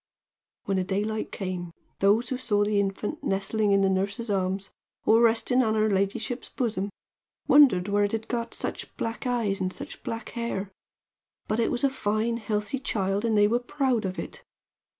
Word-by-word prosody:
"When 195 -1 0
the 185 - +1
daylight 205 +3 -2
came, 180 -3 -4 0.3
those 210 +4 +3
who 255 - -1
saw 210 -5 +1
the 205 0 +2
infant 200 +8 -2
nestling 200 +2 +1
in 195 0 +4
the - - +4
nurse's 200 +4 -1
arms, 190 0 -1 0.3
or 225 +1 +5
resting 235 +2 +4
on 220 -3 +1
her 215 0 +2
ladyship's 200 +6 -1
bosom, 215 -5 -2 0.6
wondered 250 -11 +6
where 205 0 +3
it 220 +2 -3
got 235 -1 -3
such - - -5
black 230 +3 -3
eyes 225 -6 0
and 185 0 0
such - - -8
black 230 0 -5
hair; 220 -5 -3 0.8
but 215 - 0
it 230 - +2
was 245 - -2
a 275 - +5
fine, 225 -2 0
healthy 215 +4 -2
child, 200 -6 -1
and 225 -2 +2
they 205 0 +6
were 235 +3 +2
proud 255 -2 0
of 185 -1 -3
it. 165 - -7
215 Hz, 175 wpm, -27 LUFS, 195-235 Hz, 0.8 s, wondered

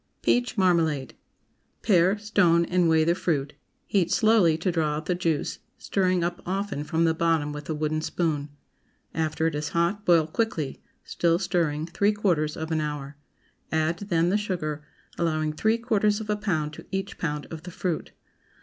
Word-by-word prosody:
PEACH 245 -1 +1
MARMALADE. 165 -8 +2 0.7
✠ - - -46
Pare, 190 -1 +4
stone, 190 -5 +3
and 180 -1 +2
weigh 160 -1 +4
the 170 +2 +3
fruit; 150 -5 -1 0.3
heat 180 -4 +1
slowly 215 -8 +4
to 180 +3 0
draw 155 -3 0
out 155 +1 -5
the 180 - +1
juice, 165 -4 -1 0.2
stirring 185 -3 +1
up 175 +2 -2
often 195 -4 -2
from 160 +2 0
the 165 - +3
bottom 160 -3 +1
with 150 0 -8
a 160 - -1
wooden 155 +1 -1
spoon. 155 -3 -1 0.6
After 160 0 -1
it 165 - +1
is 150 +1 -3
hot, 175 +5 +1
boil 170 -5 +4
quickly, 160 -5 -2 0.2
still 170 -1 +1
stirring, 165 -5 0
three 200 +5 +1
quarters 170 -8 0
of 160 +1 -4
an 160 -1 +1
hour. 150 -1 -4 0.6
Add, 160 +2 0
then, 170 -1 +2
the 200 - +3
sugar, 155 -7 -3 0.4
allowing 155 -2 0
three 220 +8 +2
quarters 215 -3 +1
of 215 -1 -3
a - - +2
pound 160 -8 -1
to - - -11
each 195 0 -4
pound 150 -4 -2
of 160 -2 -6
the 180 - -9
fruit. 175 -1 -3
170 Hz, 175 wpm, -26 LUFS, 155-190 Hz, 0.7 s, Pare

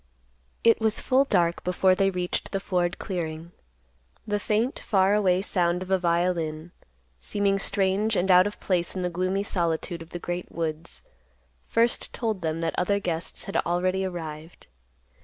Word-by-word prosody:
It 230 0 +5
was 220 0 +2
full 265 +1 +3
dark 170 -8 +1
before 185 +1 +3
they 195 +1 +2
reached 180 -1 -2
the 195 - 0
Ford 180 -2 -1
clearing. 165 -3 -4 0.7
The 205 -1 -1
faint, 220 +5 0
far 195 -2 +2
away 190 -3 +3
sound 180 -2 +1
of 185 - -9
a 190 - +3
violin, 170 -2 0 0.5
seeming 200 - 0
strange 200 +2 +1
and 190 +1 +2
out 180 +2 +7
of 205 - -7
place 175 -2 -1
in 185 - -2
the 180 - -1
gloomy 185 +3 0
solitude 170 -2 -2
of 165 - -10
the 175 - -5
great 175 +1 -5
woods, 160 0 -4 0.6
first 230 +1 +1
told 220 -5 -2
them 160 0 -2
that 165 -1 -1
other 200 +3 +1
guests 170 -3 -3
had 195 - -3
already 185 +2 0
arrived. 165 -3 -6
180 Hz, 160 wpm, -26 LUFS, 170-195 Hz, 0.7 s, out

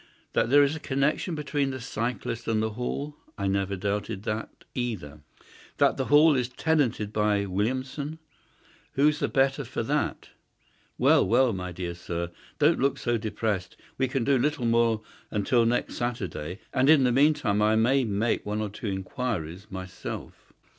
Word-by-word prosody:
That - - +2
there 145 +2 +7
is 140 +2 +1
a - - -5
connection 150 +5 0
between 145 -2 -1
the 130 -1 -4
cyclist 115 -1 -3
and 110 -1 +1
the 110 0 0
Hall. 140 +6 -4 0.2
I 100 - -2
never 100 0 0
doubted 105 +1 -3
that 110 0 -4
either. 95 - -4 0.6
That - - +3
the - - -1
Hall 150 +2 +6
is 125 -2 0
tenanted 125 -8 0
by 105 -1 +2
Williamson. 130 +10 -2 0.8
Who's 150 +2 +3
the - - +1
better 135 0 +2
for - - -4
that? - - -1 0.7
Well, - - +5
well, 130 -3 +4
my 90 -1 -4
dear 90 0 -4
sir, 85 0 -4 0.3
don't 155 +3 +4
look 135 +1 +2
so 120 -1 0
depressed. 105 -4 -2 0.2
We 130 - +3
can 130 -1 -1
do 135 +1 +3
little 145 -1 0
more 115 -1 +2 0.3
until 115 +3 +2
next 120 +1 -1
Saturday, 95 -6 -4
and 130 +1 +3
in 155 -4 +7
the 125 - +3
meantime 135 -6 +3
I 110 +1 +4
may 130 +5 +3
make 110 +1 0
one 105 +1 -2
or 105 -1 -2
two 105 +3 -7
inquiries 95 - -3
myself." 95 -1 -7
115 Hz, 165 wpm, -27 LUFS, 100-135 Hz, 0.8 s, there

